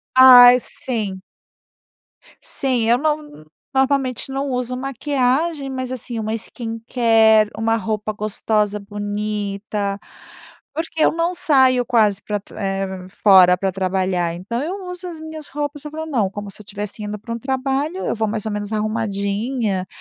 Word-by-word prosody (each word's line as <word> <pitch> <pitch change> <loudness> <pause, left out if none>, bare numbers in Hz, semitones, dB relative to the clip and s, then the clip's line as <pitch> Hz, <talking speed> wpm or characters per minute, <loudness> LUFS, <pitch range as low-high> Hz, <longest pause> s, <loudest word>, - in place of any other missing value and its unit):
Ai, 250 -1 +10
sim. 210 -7 -3 1.2
Sim, 250 -4 0
eu 240 - +5
não 295 - -3 0.3
normalmente 265 -2 +1
não 275 +1 -2
uso 250 0 -2
maquiagem, 275 +3 -1
mas 255 -1 -4
assim 240 -2 -4
uma 220 0 -2
skincare, 225 -1 +2
uma 225 +1 +1
roupa 215 0 -2
gostosa, 210 0 -1
bonita, 205 0 -3 0.8
porque 320 0 -1
eu - - +4
não 335 +2 -1
saio 260 -6 +3
quase 215 -4 +2
pra 210 -1 -3
tr - - -18
eh, 195 -2 -3
fora 185 -3 +6
para 195 0 0
trabalhar, 185 -2 -1
então 205 +8 -4
eu 370 +3 -5
uso 360 0 -7
as 325 -2 -8
minhas 315 -1 -7
roupas, 290 0 -5
eu 300 - -6
falo, 315 +1 -5
não, 235 -10 0
como 205 0 -7
se 200 - -10
eu - - -22
estivesse 205 +1 -6
indo 210 0 -4
pra 230 +3 -7
um - - -4
trabalho, 270 +7 -2
eu - - 0
vou 220 -1 -1
mais 215 0 -2
ou - - -1
menos 205 +1 -4
arrumadinha, 210 -1 -1
225 Hz, 155 wpm, -20 LUFS, 205-270 Hz, 1.2 s, Ai